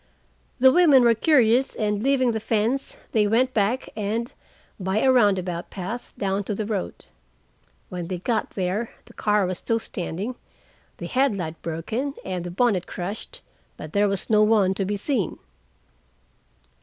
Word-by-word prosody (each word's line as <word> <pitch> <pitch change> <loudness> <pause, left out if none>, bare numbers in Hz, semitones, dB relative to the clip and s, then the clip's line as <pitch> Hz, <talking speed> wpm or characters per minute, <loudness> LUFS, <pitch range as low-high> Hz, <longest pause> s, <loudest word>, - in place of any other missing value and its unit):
The 260 +1 +6
women 295 -6 +6
were 235 -1 +6
curious, 245 0 +3
and, 210 -1 -1
leaving 260 -1 +2
the 220 - -2
fence, 225 +5 -1
they 210 -2 +3
went 250 +4 +2
back 220 +5 0
and 220 +3 -2 0.5
by 190 +1 -1
a 260 +4 +4
roundabout 190 -8 +2
path 200 +6 -6
down 195 0 -1
to 210 - -2
the 215 - -3
road. 205 - -4 0.8
When 175 -2 -5
they 185 0 -3
got 220 +5 -1
there 195 +4 -1 0.2
the - - -17
car 210 -2 +1
was 180 -1 -3
still 230 - 0
standing, 200 +1 -4 0.6
the - - -6
headlight 200 - 0
broken 220 - -3
and 185 -2 -3
the 175 - -5
bonnet 190 -1 +1
crushed, 210 - -6 0.3
but 155 - -9
there 205 0 +3
was 195 -2 -1
no 215 -1 +4
one 210 -3 +4
to 195 0 -2
be 205 +2 -1
seen." 210 - -1
210 Hz, 155 wpm, -24 LUFS, 190-240 Hz, 0.8 s, The